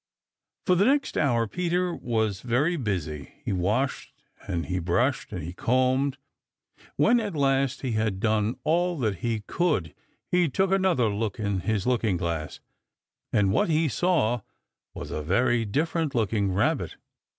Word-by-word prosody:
For 185 - +4
the 185 +3 +4
next 280 +3 +2
hour 120 -6 +2
Peter 180 - -1
was 110 - -1
very 130 +8 +1
busy. 90 - -3
He - - -1
washed 105 +9 -1 0.4
and 85 -4 -2
he 90 0 -2
brushed 85 0 0
and - - -5
he 85 +3 -6
combed. 130 +5 +1 0.8
When, 240 +1 +4
at 205 -6 -3
last, 135 -1 +1
he 130 - -1
had 110 -3 0
done 110 +2 +1
all 175 +2 +1
that 110 - -1
he 115 +3 -2
could, 145 - -1 0.4
he 180 -2 +3
took 190 +7 +1
another 185 -11 +3
look 105 0 -2
in 100 -3 -1
his 105 0 -1
looking 115 -7 +1
glass, 85 -3 -3 0.7
and 100 -2 +3
what 105 - +2
he 160 0 +2
saw 135 -7 +1 0.5
was - - -7
a 75 - -3
very 115 +8 +2
different 155 +6 -1
looking 105 -3 +1
Rabbit. 95 +2 0
120 Hz, 150 wpm, -26 LUFS, 100-155 Hz, 0.8 s, For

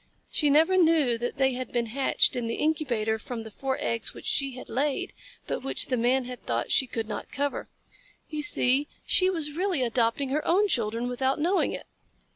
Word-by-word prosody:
She 300 -4 +1
never 320 +6 +5
knew 320 -8 +4
that 240 +1 -3
they 265 -1 +3
had 255 -1 -5
been 240 -1 0
hatched 260 +4 +2
in 240 -2 -2
the 230 - -2
incubator 240 -8 0
from 230 +1 -6
the 220 - -10
four 265 +4 -2
eggs 230 -1 -2
which - - -10
she 275 -2 0
had 255 - -9
laid, 275 +3 -1 0.3
but - - -3
which 270 - -1
the 255 - +2
Man 250 +2 +2
had 250 -1 -8
thought 115 0 -2
she 265 - +3
could 225 -2 -4
not 215 - -6
cover. 285 +1 -2 0.6
You 305 -1 -4
see 285 -1 +2 0.2
she 370 0 +4
was 320 -5 -2
really 350 -3 0
adopting 240 +2 +1
her 300 +3 0
own 395 +5 +3
children 230 - -1
without 260 +2 0
knowing 355 +6 +2
it. - - -6
265 Hz, 200 wpm, -27 LUFS, 240-300 Hz, 0.6 s, never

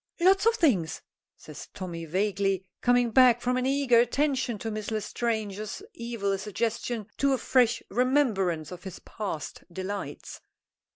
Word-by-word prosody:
"Lots 385 +4 +4
of 460 - +4
things," 190 - +1 0.3
says 150 -2 -10
Tommy, 175 -4 -5
vaguely, 195 +2 0 0.2
coming 245 -1 +3
back 250 -1 +6
from 250 +1 0
an 255 0 0
eager 270 -3 +4
attention 255 -1 +1
to 225 +2 -4
Miss 215 -1 -4
L'Estrange's 215 - -3
evil 230 -4 -2
suggestion 225 +2 -2
to 280 -1 +2
a - - +2
fresh 240 -2 +2
remembrance 205 - +1
of 180 -1 -8
his 190 -2 -7
past 195 -9 -6
delights. 190 +3 -6
225 Hz, 135 wpm, -27 LUFS, 195-250 Hz, 0.3 s, back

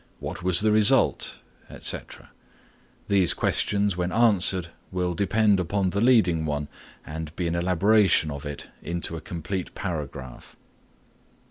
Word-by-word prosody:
"what - - -6
was 90 0 +5
the 110 0 +2
result?" 105 -1 +4 0.3
etc. - - -3 0.8
These 95 -3 +3
questions 100 -2 0
when 90 0 -2
answered 95 -6 +2 0.2
will 90 -1 -2
depend 100 +2 +2
upon 95 +1 -1
the 100 - -1
leading 110 -10 +3
one 75 -1 -3 0.4
and 80 0 -7
be 90 - -3
an 85 - -2
elaboration 90 -1 +2
of 70 0 -7
it 75 0 -7
into 85 -1 -4
a 80 - -7
complete 90 +2 -6
paragraph. 70 -8 -7
90 Hz, 130 wpm, -25 LUFS, 80-100 Hz, 0.8 s, was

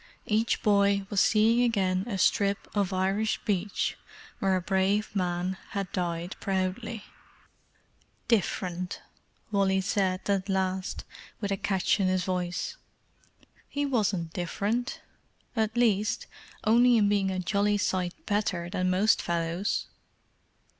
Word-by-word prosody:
Each 220 +2 +1
boy 200 -1 +3
was 200 - +3
seeing 225 +2 +4
again 195 -5 +1
a 205 -5 -2
strip 200 +1 +2
of 200 -2 +1
Irish 195 +3 0
beach 200 -1 -1 0.4
where 195 -1 +2
a - - +2
brave 195 +3 +1
man 180 0 -1 0.2
had 195 -2 -3
died 175 0 -2
proudly. 195 +3 -2 1.2
"Different!" 185 -4 0 0.5
Wall 195 -2 +2
said, 190 -1 0
at 200 -1 0
last, 190 0 -1 0.4
with 200 -2 -3
a - - +2
catch 195 +2 +1
in 190 - +2
his 185 0 +1
voice. 180 -1 -2 0.9
"He 285 0 -1
wasn't 200 - 0
different—at 220 +3 -3
least, 215 -3 +2 0.4
only 235 +2 +5
in 210 -2 +4
being 200 -1 +2
a 190 - -2
jolly 205 +3 +1
sight 185 -3 -2
better 185 -5 -1
than 185 -2 0
most 195 +4 +3
fellows." 170 +3 -1
195 Hz, 120 wpm, -28 LUFS, 185-210 Hz, 1.2 s, only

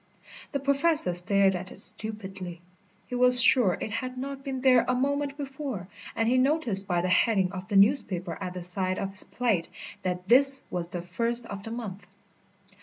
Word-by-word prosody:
The 280 - -3
Professor 280 - +1
stared 190 +2 +3
at 185 +1 -7
it - - -7
stupidly. 195 -5 -5 0.5
He - - -12
was 250 0 +5
sure 235 -6 +6
it 220 - -6
had 255 +4 -6
not 275 +1 -7
been 265 -2 -6
there 255 -2 +3
a 255 - 0
moment 280 +2 -3
before, 270 - -7 0.3
and 225 - -1
he 255 +2 +1
noticed 255 -9 +1
by 175 -2 -1
the 180 - -3
heading 190 -1 +1
of 185 -1 -9
the 200 - -5
newspaper 195 - +1
at 185 -1 -6
the 180 - -7
side 185 +1 -1
of 195 -1 -5
his 195 - +2
plate 225 -9 -2 0.3
that 180 0 -5
this 270 +4 +6
was 175 -1 -5
the 175 -1 -7
first 230 +6 +1
of 200 -3 -9
the 225 - -10
month. 205 -5 -8
215 Hz, 185 wpm, -25 LUFS, 185-255 Hz, 0.5 s, sure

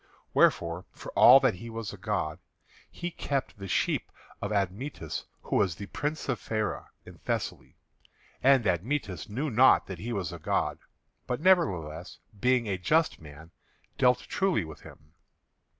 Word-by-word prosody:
Wherefore, 85 +1 +2
for - - -9
all 130 +2 +8
that 130 - +3
he 105 +6 -9
was 115 -2 -5
a - - -9
god, 75 0 -2 0.5
he 175 0 -5
kept 140 -9 -3
the 100 - -6
sheep - - 0 0.3
of 100 - -3
Admetus, 100 +7 -3 0.2
who - - 0
was 95 -5 +2
the 100 - -7
Prince 150 +8 -4
of 130 -3 -1
Pheræ 110 -1 -3 0.2
in - - -13
Thessaly. - - -4 0.6
And 135 -2 +5
Admetus 100 - -1
knew 135 +8 -2
not 130 +4 +5
that 95 -4 -7
he 115 +5 -5
was 95 -7 -3
a 85 - -8
god; - - -1 0.5
but, 125 - -2
nevertheless, 95 - +1 0.2
being 125 0 +2
a 95 -2 -2
just 155 - +1
man, 80 +2 -13 0.5
dealt 125 0 +4
truly 190 - 0
with 80 -1 -10
him. 75 0 -15
105 Hz, 155 wpm, -28 LUFS, 90-130 Hz, 0.6 s, all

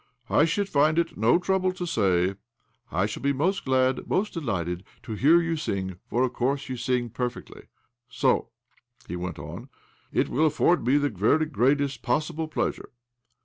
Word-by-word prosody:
'' 120 - -35
I - - +6
should 200 +5 0
find 155 -1 +3
it 170 -1 0
no 115 +8 +4
trouble 185 +1 +1
to 180 -1 -4
say: 95 - +1 0.3
' - - -45 0.3
I 95 +4 +1
shall 105 - -5
be 140 0 +1
most 180 +9 0
glad, 130 -1 +1
most 210 +3 0
delighted, 90 - -3 0.2
to 110 - -6
hear 150 +10 +5
you 165 -1 -1
sing, 95 - -3
for 120 +3 +1
of 130 -1 0
course 135 +3 -1
you 130 - -2
sing 125 -1 -1
perfectly.* 125 +1 -5 0.4
So," - - +1 0.6
he 90 - -4
went 90 -1 -5
on, - - -8
" - - -33
' - - -37
it - - +1
will 155 +4 +2
afford 155 -2 +2
me 135 +3 +5
the 145 0 +1
very 115 - +2
greatest 140 -1 +1
possible 160 +1 -1
pleasure.' 155 - -3
135 Hz, 190 wpm, -26 LUFS, 110-160 Hz, 0.6 s, I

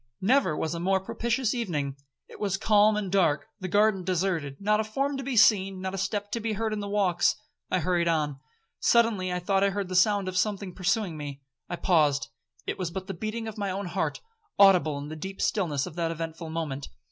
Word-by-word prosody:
Never 205 - +2
was 160 - -2
a 170 - -4
more 190 +2 +2
propitious 235 +5 -1
evening. 155 - -2 0.3
It - - -13
was 195 -2 0
calm 210 0 +4
and 200 -3 -3
dark—the 190 +2 0
garden 205 0 +3
deserted, 175 -6 -1
not 210 +1 +2
a - - +2
form 275 +6 -1
to - - -3
be 255 -2 -2
seen, 195 -3 +4
not 190 0 -4
a - - -3
step 205 +1 -2
to 230 - -1
be 225 0 -2
heard 220 +1 -1
in 215 - -2
the 205 0 -4
walks.—I 185 -2 0
hurried 175 +1 +1
on. 150 -4 0 0.4
Suddenly 225 -6 +3
I 180 - -1
thought 195 +2 +1
I 200 - +4
heard 195 -1 -3
the 185 - -3
sound 200 +1 +3
of 185 - -4
something 200 -1 -1
pursuing 180 -1 0
me. 140 -2 -7 0.3
I 175 - -2
paused,—it 140 - -1
was 180 -2 -1
but 190 +2 -5
the 195 - -5
beating 220 +5 -4
of 220 -1 -7
my 200 -1 -1
own 195 +2 -3
heart, 175 +2 -2 0.4
audible 180 -7 +5
in 145 +1 -6
the 155 - -6
deep 190 +5 -7
stillness 155 -10 0
of 180 - -8
that 165 -1 0
eventful 165 0 -5
moment. 155 -4 -4
190 Hz, 210 wpm, -27 LUFS, 165-210 Hz, 0.4 s, audible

